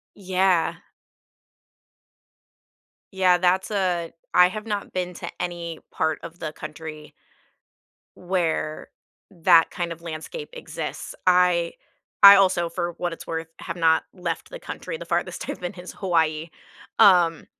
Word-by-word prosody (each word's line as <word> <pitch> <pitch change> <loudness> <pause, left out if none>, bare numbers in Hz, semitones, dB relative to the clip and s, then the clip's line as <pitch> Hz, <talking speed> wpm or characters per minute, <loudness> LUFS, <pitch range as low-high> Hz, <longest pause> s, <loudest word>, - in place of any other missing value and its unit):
Yeah. 185 -3 +1 2.3
Yeah, 185 -2 +4
that's 185 +3 +1
a 180 -4 -1 0.2
I 180 0 +7
have 215 +3 -6
not 205 -2 -4
been 180 -1 -2
to - - -6
any 170 -2 -4
part 160 -1 -1
of 170 +1 -10
the 155 - -4
country 155 0 -9 1.0
where 170 -4 -2 0.4
that 170 -2 +4
kind 175 -1 -3
of 165 0 -8
landscape 170 - -7
exists, 480 - -6
I 180 -2 +3 0.5
I 200 0 +12
also, 185 -3 +3
for 175 -1 -3
what 175 -1 -1
it's - - -10
worth, 165 0 -4
have 170 - -6
not 160 -2 +3
left 175 -3 -4
the - - -7
country, 485 - -6
the - - -9
farthest - - -2
I've - - -4
been 180 -1 -5
is 180 0 -10
Hawaii, 165 -3 0 0.5
um, 175 -4 +5
175 Hz, 135 wpm, -24 LUFS, 165-185 Hz, 2.3 s, I